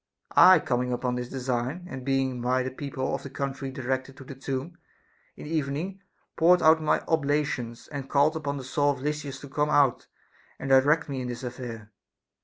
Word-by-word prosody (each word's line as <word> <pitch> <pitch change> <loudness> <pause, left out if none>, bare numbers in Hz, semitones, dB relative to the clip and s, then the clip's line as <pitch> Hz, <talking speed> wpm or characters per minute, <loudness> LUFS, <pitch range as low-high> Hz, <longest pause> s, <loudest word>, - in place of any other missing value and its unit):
I 185 0 +9
coming 125 -4 -1
upon 125 0 -1
this 125 0 -4
design, 130 +5 -3
and 130 -4 -7
being 135 -2 0
by 125 +1 +1
the 130 - -4
people 135 -1 -4
of 135 - -2
the 140 - -8
country 135 0 -4
directed 130 0 -3
to - - -10
the 135 - -9
tomb, 135 +5 -5 0.6
in - - -9
the 150 - -7
evening 160 +6 -2 0.3
poured 175 +2 +5
out 160 0 +6
my 155 - +2
oblations, 145 -6 -1
and 140 -2 -6
called 145 +3 +3
upon 145 -2 -3
the 135 - -6
soul 145 +2 +1
of 130 - -10
Lysis 145 -2 -3
to 140 - -8
come 145 +2 0
out 140 -5 +3 0.5
and 135 - -4
direct 145 +5 +4
me 135 -3 -3
in 125 - -4
this 120 +2 -6
affair. 120 -3 -7
135 Hz, 195 wpm, -27 LUFS, 130-150 Hz, 0.6 s, I